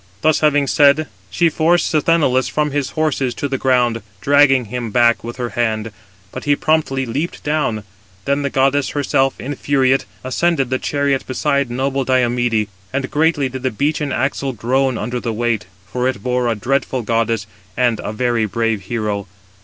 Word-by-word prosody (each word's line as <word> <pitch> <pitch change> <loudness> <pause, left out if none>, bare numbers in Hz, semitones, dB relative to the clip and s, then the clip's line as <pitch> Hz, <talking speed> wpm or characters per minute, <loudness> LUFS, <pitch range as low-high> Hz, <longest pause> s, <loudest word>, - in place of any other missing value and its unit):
Thus 155 -1 +3
having 145 -2 +3
said, 145 +2 +4 0.2
she 170 - +2
forced 165 +2 +2
Sthenelus 150 -4 +2
from 150 -1 0
his 145 -2 -1
horses 140 -5 0
to 145 - -2
the 135 -1 -3
ground, 125 -3 +2 0.2
dragging 135 +1 +4
him 120 +1 -4
back 120 +1 +3
with 120 +1 -6
her 120 -1 -3
hand; 110 -2 -1 0.4
but - - -7
he 145 0 +3
promptly 140 -4 0
leaped 145 +8 -4
down. 145 -8 -1 0.4
Then 140 +1 +1
the 140 - -1
goddess 135 +1 +2
herself, 135 -1 +1
infuriate, 135 -1 +1 0.2
ascended 135 0 0
the 130 - +1
chariot 140 -2 -1
beside 140 0 0
noble 135 +2 -1
Diomede, 120 -4 +1 0.2
and 135 0 -3
greatly 150 -2 +2
did 130 0 -6
the 130 - 0
beechen 145 +4 -1
axle 135 +1 -1
groan 130 +2 0
under 125 0 -3
the 120 - -3
weight; 110 -3 -1 0.2
for 125 +6 -2
it 130 - -3
bore 125 -1 0
a 115 - +1
dreadful 130 +3 -1
goddess 115 -1 0 0.3
and 120 -3 +2
a - - -3
very 120 0 0
brave 115 -2 -1
hero. 105 -2 -2
130 Hz, 170 wpm, -18 LUFS, 120-145 Hz, 0.4 s, said